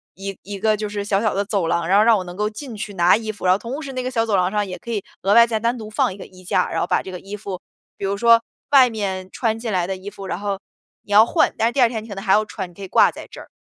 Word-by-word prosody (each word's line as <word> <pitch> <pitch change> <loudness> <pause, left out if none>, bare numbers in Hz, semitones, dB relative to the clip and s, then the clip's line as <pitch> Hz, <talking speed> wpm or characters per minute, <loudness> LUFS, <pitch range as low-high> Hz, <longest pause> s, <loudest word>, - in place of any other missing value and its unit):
一 195 0 -6
一 200 0 -7
个 215 +1 +2
就 210 0 -4
是 205 -1 -4
小 200 -1 +1
小 215 -2 +1
的 200 +1 -1
走 200 -5 -1
廊， 170 0 0
然 195 - +4
后 210 - +6
让 225 -1 +5
我 185 - -3
能 175 0 -8
够 210 +2 -1
进 235 +2 -8
去 205 -1 -6
拿 175 0 +5
衣 220 0 -3
服。 205 - -9
然 180 - +6
后 - - +1
同 260 +8 -5
时 275 -3 -7
那 255 - -3
个 255 - -3
小 230 -2 +1
走 215 -3 +1
廊 180 0 +2
上 210 -1 0
也 180 - -6
可 235 - -8
以 215 -3 -1 0.2
额 195 +2 +2
外 235 +1 +7
再 225 -1 -1
单 235 +3 0
独 215 -2 -8
放 215 - 0
一 195 - -12
个 - - -9
衣 185 0 -16
架， 180 +1 +1
然 - - -1
后 - - +1
把 - - +1
这 190 - -8
个 180 - -6
衣 200 +3 -8
服， 195 -3 -6 0.4
比 - - -9
如 200 +1 -1
说 230 +1 +5 0.3
外 265 -3 +7
面 190 -4 -4
穿 225 -2 -1
进 225 -1 -4
来 180 -2 0
的 190 - -2
衣 190 +2 -8
服， 195 -1 -9
然 180 - -3
后 200 -1 -3 0.4
你 205 - -14
要 215 +2 +8
换， - - +2
但 225 - +1
是 - - 0
第 275 - -3
2 240 - +7
天 225 -2 -4
你 225 - -13
可 - - -5
能 195 - -6
还 190 - +3
要 215 - +4
穿， 185 - -6
你 - - -19
可 200 - -14
以 190 - -6
挂 - - +5
在 - - -10
这 - - -10
儿。 - - -12
205 Hz, 370 characters per minute, -21 LUFS, 190-225 Hz, 0.4 s, 要